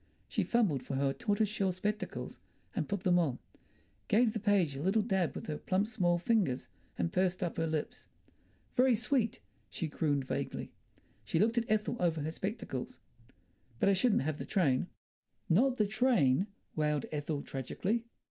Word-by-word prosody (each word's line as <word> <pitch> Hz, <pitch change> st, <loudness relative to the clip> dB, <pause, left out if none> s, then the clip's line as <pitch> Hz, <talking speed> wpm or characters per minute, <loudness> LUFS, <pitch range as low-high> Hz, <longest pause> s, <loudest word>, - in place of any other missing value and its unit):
She -, -, 0 dB
fumbled 205 Hz, -, +2 dB
for 135 Hz, -, -4 dB
her 135 Hz, 0 st, +1 dB
tortoise 215 Hz, -, +1 dB
shell 195 Hz, -2 st, 0 dB
spectacles 210 Hz, +4 st, -3 dB, 0.4 s
and -, -, -1 dB
put 200 Hz, -2 st, -1 dB
them 180 Hz, -1 st, +4 dB
on, 140 Hz, -8 st, +1 dB, 0.7 s
gave 220 Hz, +1 st, +4 dB
the 220 Hz, -, -2 dB
page 195 Hz, -9 st, +2 dB
a 135 Hz, -, -5 dB
little 195 Hz, +6 st, +2 dB
dab 190 Hz, -6 st, 0 dB
with -, -, -6 dB
her 150 Hz, -2 st, -4 dB
plump 190 Hz, +2 st, +1 dB
small 180 Hz, -7 st, +1 dB
fingers, 175 Hz, -, +1 dB, 0.3 s
and 85 Hz, -2 st, -1 dB
pursed 185 Hz, 0 st, +1 dB
up 175 Hz, -, -3 dB
her 165 Hz, 0 st, +1 dB
lips. 155 Hz, -1 st, -3 dB, 0.7 s
"Very 255 Hz, -1 st, +5 dB
sweet!" 230 Hz, 0 st, 0 dB, 0.3 s
she 165 Hz, -, -3 dB
crooned 145 Hz, -2 st, 0 dB
vaguely; -, -, -3 dB, 0.5 s
she 105 Hz, -, -1 dB
looked 225 Hz, +6 st, +3 dB
at 230 Hz, -, -5 dB
Ethel 215 Hz, +2 st, +1 dB
over 165 Hz, -3 st, +1 dB
her 155 Hz, +2 st, -2 dB
spectacles. 185 Hz, -, -4 dB, 0.8 s
"But 195 Hz, -, +4 dB
I -, -, +5 dB
shouldn't 200 Hz, -, +3 dB
have 155 Hz, +1 st, -2 dB
the -, -, -4 dB
train." 145 Hz, -11 st, +2 dB, 0.6 s
"Not 250 Hz, +9 st, +3 dB
the 215 Hz, -, +3 dB
train!" 200 Hz, -, +3 dB, 0.3 s
wailed 150 Hz, -2 st, +1 dB
Ethel 150 Hz, -1 st, -2 dB
tragically. 195 Hz, -, -2 dB
185 Hz, 165 wpm, -32 LUFS, 150-215 Hz, 0.8 s, Very